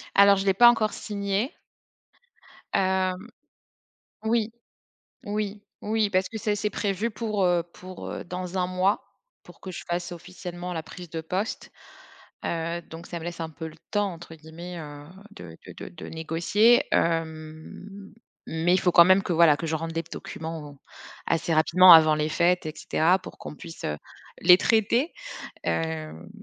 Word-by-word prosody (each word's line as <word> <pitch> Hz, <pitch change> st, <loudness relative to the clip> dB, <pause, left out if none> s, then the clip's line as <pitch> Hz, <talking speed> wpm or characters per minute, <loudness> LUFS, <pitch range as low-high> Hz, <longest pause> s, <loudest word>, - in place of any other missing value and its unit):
Alors, 200 Hz, 0 st, +7 dB
je 195 Hz, +1 st, -2 dB
l'ai 195 Hz, -, +4 dB
pas 240 Hz, +5 st, +8 dB
encore 225 Hz, -2 st, +2 dB
signé. 200 Hz, -, -2 dB, 1.2 s
Hem, 190 Hz, +2 st, 0 dB, 1.0 s
oui, 225 Hz, 0 st, +1 dB, 0.7 s
oui, 205 Hz, -1 st, -3 dB, 0.2 s
oui 215 Hz, -1 st, 0 dB
parce 185 Hz, -1 st, +1 dB
que 220 Hz, -, -6 dB
ça 215 Hz, -1 st, 0 dB
c'est 210 Hz, +1 st, -2 dB
prévu 205 Hz, +3 st, -1 dB
pour, 215 Hz, -2 st, -1 dB
heu, 175 Hz, -1 st, +3 dB
pour, 185 Hz, 0 st, -9 dB
heu, -, -, -6 dB
dans 180 Hz, +1 st, -5 dB
1 180 Hz, -, +1 dB
mois, 185 Hz, +2 st, +1 dB, 0.4 s
pour -, -, -17 dB
que 190 Hz, -, -7 dB
je 180 Hz, -, -7 dB
fasse 175 Hz, +1 st, -2 dB
officiellement 175 Hz, +1 st, -7 dB
la 165 Hz, -2 st, -3 dB
prise 175 Hz, +1 st, -11 dB
de 165 Hz, -, -4 dB
poste, 185 Hz, +7 st, -4 dB, 0.7 s
heu, 170 Hz, +1 st, -2 dB
donc 165 Hz, +1 st, -11 dB
ça 175 Hz, -, -5 dB
me 160 Hz, -, -9 dB
laisse 175 Hz, 0 st, -6 dB
un 160 Hz, -, -4 dB
peu 160 Hz, +1 st, -7 dB
«le 155 Hz, -, -14 dB
temps» 205 Hz, -2 st, 0 dB
entre 165 Hz, -1 st, -11 dB
guillemets, 165 Hz, +3 st, -9 dB
heu, 145 Hz, -2 st, -9 dB, 0.3 s
de 85 Hz, -, -11 dB
de -, -, -9 dB
de -, -, -9 dB
de 85 Hz, -, -10 dB
négocier. 170 Hz, +9 st, +3 dB
Hem, 165 Hz, +4 st, -3 dB, 0.3 s
mais 165 Hz, +2 st, +1 dB
il 185 Hz, -, +3 dB
faut 180 Hz, -, +2 dB
quand 170 Hz, -, +9 dB
même 185 Hz, +2 st, +5 dB
que, -, -, -1 dB
voilà, 165 Hz, -3 st, +6 dB
que 165 Hz, -, -5 dB
je 160 Hz, -, -1 dB
rende 165 Hz, +1 st, -3 dB
les 165 Hz, -, -1 dB
p -, -, -20 dB
documents, 155 Hz, -3 st, -7 dB, 0.5 s
assez 165 Hz, 0 st, 0 dB
rapidement, 175 Hz, +3 st, +7 dB
avant 155 Hz, -2 st, +8 dB
les 150 Hz, 0 st, 0 dB
fêtes 175 Hz, +2 st, +2 dB
et 155 Hz, -, -3 dB
cetera, 175 Hz, +4 st, +2 dB
pour -, -, -12 dB
qu'on -, -, -8 dB
puisse, 165 Hz, -, -10 dB
heu, 75 Hz, -, -2 dB, 0.4 s
les 180 Hz, +1 st, +8 dB
traiter. 230 Hz, -, +2 dB, 0.5 s
Hem, 160 Hz, -1 st, -3 dB
180 Hz, 175 wpm, -26 LUFS, 165-200 Hz, 1.2 s, quand